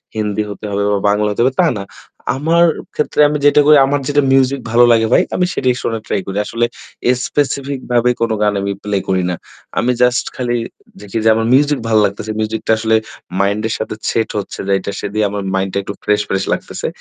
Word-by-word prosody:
হিন্দি 105 -1 -1
হতে 100 +1 -8
হবে 100 0 0
বা 100 - +2
বাংলা 105 +1 +2
হতে 105 - -1
হবে 130 +1 +2
তা 175 - +4
না। - - -4 0.5
আমার 165 +4 +3 0.3
ক্ষেত্রে 150 - +1
আমি 150 0 -1
যে - - +9
টুকুই, 150 +1 +6
আমার 145 +1 0
যেটা 145 0 +2
মিউজিক 135 +1 +3
ভালো 120 +1 +5
লাগে 115 -1 +3
ভাই, - - +5
আমি 180 - +2
সেটাই 130 -2 +1
শোনার 115 -1 -2
ট্রাই - - -1
করি। 95 +1 -5
আসলে 115 +2 0 0.6
স্পেসিফিক 140 -1 -1
ভাবে 120 0 +3
কোন 115 -1 +1
গান 105 -1 +2
আমি 100 0 -2
প্লে 105 -1 -1
করি 95 -1 +1
না। 90 - -1 0.4
আমি 125 - +2
জাস্ট 125 0 +3
খালি 120 -1 -1 0.4
দেখি 105 +2 -5
যে - - +6
আমার 110 0 0
মিউজিক 145 +1 +3
ভাল 110 -1 +3
লাগতেছে। 100 +2 -4
মিউজিকটা 110 +1 -2
আসলে 110 0 +1 0.4
মাইন্ড 100 +2 +1
এর 110 - -2
সাথে 110 - -4
সেট 115 - 0
হচ্ছে 100 - -7
যেটা 100 0 0
সে - - -3
দিয়ে 110 0 +1
আমার 100 -1 -3
মাইন্ডটা 95 0 -1
একটু 100 - -5
ফ্রেশ, 105 0 +2
ফ্রেশ 95 - 0
লাগতেছে। - - -4
110 Hz, 210 wpm, -16 LUFS, 105-130 Hz, 0.6 s, যে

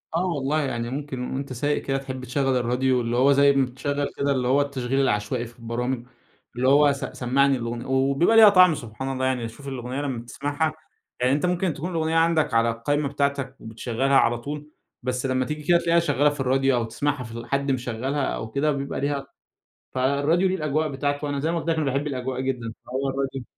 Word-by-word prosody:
آه 175 +2 +1
والله 155 -3 0
يعني 120 -4 -2
ممكن 130 -2 -4
وأنت 135 0 -4
سايق 145 +4 0
كده 135 0 -1
تحِب 130 -1 -6
تشغل 135 +1 0
الراديو، 125 +1 +1
اللي 115 0 -2
هو 135 +3 +5
زي 140 0 +5
ما 135 -1 +3
بتشغل 140 +3 -3
كده 140 0 +1
اللي 130 -2 0
هو 135 +3 +4
التشغيل 135 -2 -1
العشوائي 115 0 0
في 120 +1 -14
البرامج، 120 +1 -3 0.5
اللي 125 +1 0
هو 145 +2 +6
س 140 - -7
سمعني 135 +2 +1
الأغنية، 120 0 -4
وبيبقى 135 +9 +2
ليها 220 -2 +10
طعم 185 -4 +6
سبحان 125 +2 -6
الله. 130 0 -1
يعني 125 -3 0
شُوف 140 +5 -12
الأغنية 130 0 -4
لما 130 -5 -4
تسَمعها، 145 +5 -2 0.5
يعني 125 +1 +3
أنت 145 +4 +1
ممكن 180 -1 0
تكون 165 +6 -5
الأغنية 160 -1 0
عندك 165 -4 +2
على 115 0 +3
القايمة 140 +6 -1
بتاعتك 140 -1 -1
وبتشغلها 120 +4 -1
على 120 -1 +3
طول، 145 +4 -7 0.3
بس 125 +1 -2
لما 130 -1 +1
تيجي 150 +1 -5
كده 175 +3 +4
تلقيها 170 0 +3
شغّالة 145 -3 +2
في 145 - -7
الراديو 135 0 +2
أو 120 - +1
تسمَعها 135 +4 -2
في 115 - -10
ال 115 +1 -7
حد 140 +2 0
مشغّلها 130 +3 -2
أو 110 -3 -4
كده 145 +5 +1
بيبقى 140 -1 -3
ليها 140 -1 -2 0.7
فالراديو 140 +8 +2
ليه 185 - 0
الأجواء 155 -1 0
بتاعته، 145 +1 -2
وأنا 140 -1 -2
زي 160 +3 0
ما 170 - 0
قلت 165 - -6
لك 165 - +2
أنا 155 - 0
باحب 140 +1 -1
الأجواء 130 -2 -3
جدًا، 125 -4 -3
فهو 135 +2 -2
الراديو 135 -1 -3
135 Hz, 210 wpm, -24 LUFS, 125-145 Hz, 0.7 s, ليها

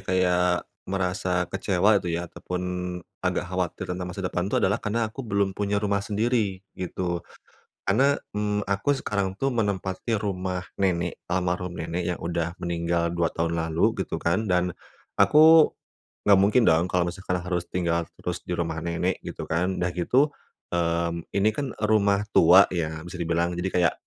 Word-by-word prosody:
kayak 90 -1 +2 0.5
merasa 90 -1 0
kecewa 100 +2 +2
itu 90 - -5
ya 85 - -3
ataupun 90 +2 -5 0.6
agak - - 0
khawatir 90 -2 -2
tentang 90 0 -4
masa 95 +1 -6
depan 90 +1 -1
tuh - - +2
adalah 105 +4 +1
karena 115 +1 0
aku 110 +5 -8
belum 100 -4 0
punya 100 +1 -1
rumah 100 -1 0
sendiri 105 -2 0
gitu. 90 -1 -3 0.7
Karena, 135 +8 +3 0.2
mmm, 105 0 -1
aku 100 +8 +1
sekarang 100 -5 -1
tuh 135 - +1
menempati 100 0 -1
rumah 95 -2 -2 0.2
nenek 90 -2 0
almarhum 90 0 -1
nenek 85 +2 -3
yang 90 - -3
udah 85 0 -2
meninggal 85 0 0
2 85 -1 +1
tahun 85 0 -1
lalu, 80 0 +1
gitu - - -4
kan, 85 +6 +1
dan 90 -1 +1 0.4
aku 155 +9 +7 0.6
nggak 100 -1 +7
mungkin 105 +5 +4
dong 80 +2 +3
kalau 90 -1 +1
misalkan 90 0 -3
harus 90 -1 -2
tinggal 85 -2 0
terus 90 0 -4
di - - -2
rumah 85 -1 -2
nenek 85 +2 -1
gitu - - -6
kan. 90 +3 0
Dah 90 - +1
gitu, 125 - +2 0.4
mmm, 85 -1 0
ini 100 +2 +3
kan 130 +3 -4
rumah 105 -2 +3
tua 90 +4 +7
ya 80 -3 -2
bisa 85 +1 -8
dibilang 85 +1 0
jadi 95 - -1
kayak, 90 -1 +3
90 Hz, 160 wpm, -25 LUFS, 85-100 Hz, 0.7 s, aku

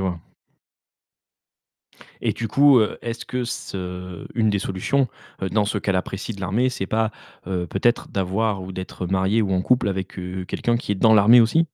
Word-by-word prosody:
vois. 90 -3 -2 2.0
Et - - +1
du 115 -2 -4
coup, 140 +1 +6
heu, 105 - 0
est-ce 115 0 -5
que 125 -1 -3
ce 90 -5 -6
une 110 -2 +2
des 100 - +1
solutions, 110 +8 0 0.4
dans 105 -1 +2
ce 105 +1 -1
qu'elle 95 -1 0
apprécie 95 +4 -3
de 100 - -11
l'armée, 105 +7 +1
c'est 120 -6 -3
pas, 110 +2 0 0.4
heu, 90 -2 -2
peut-être 115 +8 0
d'avoir 100 +1 -1
ou 95 - -7
d'être 95 0 -5
marié 95 +4 +2
ou 95 -2 -1
en 90 0 +1
couple 125 -3 +2
avec, 95 0 -4
heu, 90 0 -5
quelqu'un 120 +5 0
qui 105 - -2
est - - 0
dans 110 +3 +5
l'armée 110 +4 +7
aussi? 160 +9 +3
100 Hz, 185 wpm, -23 LUFS, 95-115 Hz, 2.0 s, l'armée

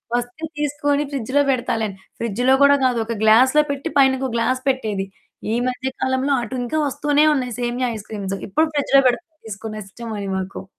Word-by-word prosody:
"వస్తే 245 +6 -4 0.2
తీసుకొని 290 0 0
ఫ్రిడ్జ్‌లో 275 +3 +1
పెడతాలే" 230 -3 -1
అని. 195 - -10 0.2
ఫ్రిడ్జ్‌లో 245 +4 +2
కూడా 285 0 +7
కాదు. 245 -2 +2
ఒక 230 0 -3
గ్లాస్‌లో 260 +7 +5
పెట్టి 280 +4 -4
పైన 270 -1 +6
ఇంకో 265 -1 -2
గ్లాస్ 255 +3 0
పెట్టేది. 215 -7 -1 0.5
ఈ - - +1
మధ్య 255 +1 -4
కాలంలో 260 +2 +1
అటుంకా 250 +4 -3
వస్తూనే 290 +2 +2
ఉన్నాయి, 250 -5 -2
సేమియా 245 +1 -1
ఐస్‌క్రీమ్స్. 200 -2 -5
ఇప్పుడు 315 +10 +2
ఫ్రిడ్జ్‌లో 275 -1 +4
పెడతుంది 315 +5 -6
తీసుకుని, 215 +1 -6
ఇష్టమని 205 -1 -6
మాకు. 190 +1 -5
255 Hz, 160 wpm, -21 LUFS, 220-280 Hz, 0.5 s, కూడా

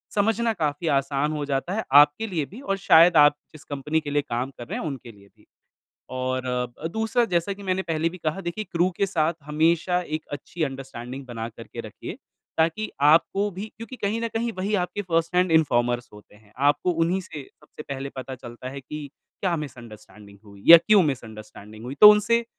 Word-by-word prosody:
समझना 225 +2 +1
काफ़ी 155 -2 -2
आसान 140 +2 0
हो 150 -1 -3
जाता 135 +7 -1
है 220 - -1 0.2
आपके 150 +10 +1
लिए 165 -8 -2
भी 215 - -12
और 195 -7 -2
शायद 175 -3 +6
आप 145 0 +7 0.2
जिस 155 -1 -13
कंपनी 150 +3 -2
के 145 - -6
लिए 145 0 +2
काम 125 -1 -3
कर 120 - -9
रहे 215 +8 -4
हैं, - - -5
उनके 130 -4 -7
लिए 100 -1 -19
भी। - - -24 0.7
और 130 -1 -2 0.2
दूसरा, 225 +3 +1
जैसा 175 -1 0
कि 200 +1 -10
मैंने 185 0 -1
पहले 165 -1 -1
भी 185 - -10
कहा, 160 +2 -2
देखिए 195 +4 -4
क्रू 175 +2 +2
के 200 - +1
साथ 165 -3 0
हमेशा 165 +4 +1
एक 155 -2 -5
अच्छी 150 +4 -5
अंडरस्टैंडिंग 130 0 -8
बनाकर 115 -1 -7
के - - -5
रखिए, - - -8 0.4
ताकि 165 +7 +1 0.2
आपको 200 +5 +2
भी 195 +3 -6
क्योंकि 235 +3 -9
कहीं 215 +2 -2
न 230 - -1
कहीं 230 +1 -2
वही 200 +3 -1
आपके 205 - -5
फ़र्स्ट 165 -2 -1
हैंड 180 -2 +3
इन्फॉर्मर्स 120 -3 0
होते 105 0 -16
हैं। 105 -1 -23
आपको 145 +5 +2
उन्हीं 170 +3 0
से 150 -5 -9 0.2
सबसे - - -12
पहले 140 -1 -5
पता 130 0 -6
चलता 120 +1 -9
है 140 - -7
कि 150 +3 -7 0.3
क्या 180 -3 0
मिसअंडरस्टैंडिंग 110 -7 -10
हुई 100 -1 -15
या - - +14
क्यों 210 -3 +6
मिसअंडरस्टैंडिंग 110 -5 -6
हुई। 130 - -5
तो 210 0 +12
उनसे 230 +3 +3
155 Hz, 195 wpm, -24 LUFS, 130-190 Hz, 0.7 s, या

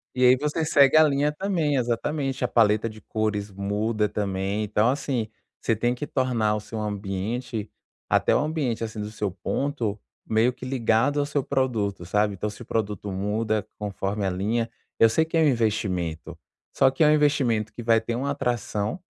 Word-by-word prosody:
E 125 - +1
aí 125 +1 +7
você 150 +3 -1
segue 145 -2 +5
a 155 - +8
linha 145 0 +2
também, 165 -4 0
exatamente, 130 +2 -1
a - - +1
paleta 110 -2 +3
de 110 -1 -10
cores 105 -2 -2
muda, 105 +2 -1
também. 100 0 -2
Então, 105 +2 +2
assim, 135 -5 -2 0.3
você 115 - +1
tem 120 +3 0
que 150 - -4
tornar 125 -7 0
o 105 - -2
seu 110 +1 -7
ambiente, 105 +3 -3 0.4
até - - +3
o - - +4
ambiente 145 -7 -1
assim 110 -1 -4
do 105 - -4
seu 105 -3 -3
ponto, 110 +2 -2 0.3
meio 115 +3 +2
que 130 - -9
ligado 130 +2 +1
ao 145 - +1
seu 145 -2 -1
produto, 115 -10 -1
sabe, 105 +2 +1
então 105 - -3
se 105 +3 -11
o 120 - -8
produto 105 -2 -2
muda, 105 +3 -1
conforme 100 0 -3
a 95 - +1
linha 110 +5 -1 0.3
eu 115 - +7
sei 160 +8 +2
que 165 - -5
é 165 - +4
um 155 - +5
investimento, 100 - -1 0.4
só 135 - +4
que 135 +4 +1
é 150 - +6
um - - +6
investimento 130 -8 +2
que 120 - -7
vai 115 0 +4
ter 115 +1 -3
um 130 - -2
atração, 125 - -2
115 Hz, 190 wpm, -25 LUFS, 105-135 Hz, 0.4 s, a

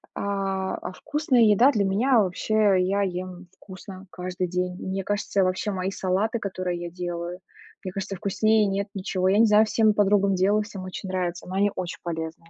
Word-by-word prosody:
а, 195 -1 -2
а 185 - -7
вкусная 295 +1 0
еда 225 +5 +6
для 210 -7 +1
меня 230 +6 +3
вообще 205 +2 +2
я 195 +2 +1
ем 185 -1 -5
вкусно 190 0 -11
каждый 180 0 -4
день. 180 +1 -2
Мне 190 +1 -3
кажется, 200 0 0
вообще 185 +3 -1
мои 190 0 -2
салаты, 195 +5 -1
которые 185 -3 -3
я 175 - -5
делаю, 175 0 -5 0.4
мне 185 - -5
кажется, 195 0 -4
вкуснее 215 +2 +2
нет 200 0 -1
ничего. 185 -1 -1
Я 195 - +3
не 230 - +7
знаю, 210 0 +5
всем 220 -1 +3
подругам 200 -1 +3
делаю, 200 +3 +2
всем 205 -2 -8
очень 185 +1 -7
нравится, 180 -2 -3
но 185 - -7
они 200 +1 +2
очень 180 -1 -5
полезные. 165 0 -5
195 Hz, 185 wpm, -25 LUFS, 185-205 Hz, 0.4 s, не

